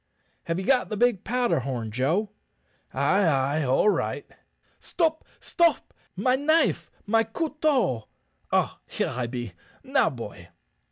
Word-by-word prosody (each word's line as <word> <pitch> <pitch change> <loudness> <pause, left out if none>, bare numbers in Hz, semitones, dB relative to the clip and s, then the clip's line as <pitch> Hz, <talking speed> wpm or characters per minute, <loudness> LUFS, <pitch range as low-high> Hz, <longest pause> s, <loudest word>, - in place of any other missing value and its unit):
"Have 165 0 -1
ye 190 - -4
got 255 0 +2
the 215 - -3
big 240 -4 +2
powder 245 - +1
horn, 120 -4 -4
Joe?" 160 - 0 0.6
"Ay, 200 +1 +2
ay, 145 -1 +1
all 135 +9 +2
right." 210 - 0 0.5
"Stop! 320 -2 -1 0.2
stop! 340 -1 +1 0.2
my 255 0 +2
knife, 310 +4 +2 0.2
my 225 +2 +3
couteau. 265 - 0 0.4
Ah, - - +1
here - - -2
I 125 -1 -2
be! 120 -5 -5 0.3
Now, 270 0 +2
boy." 105 - -9
200 Hz, 130 wpm, -26 LUFS, -, 0.6 s, my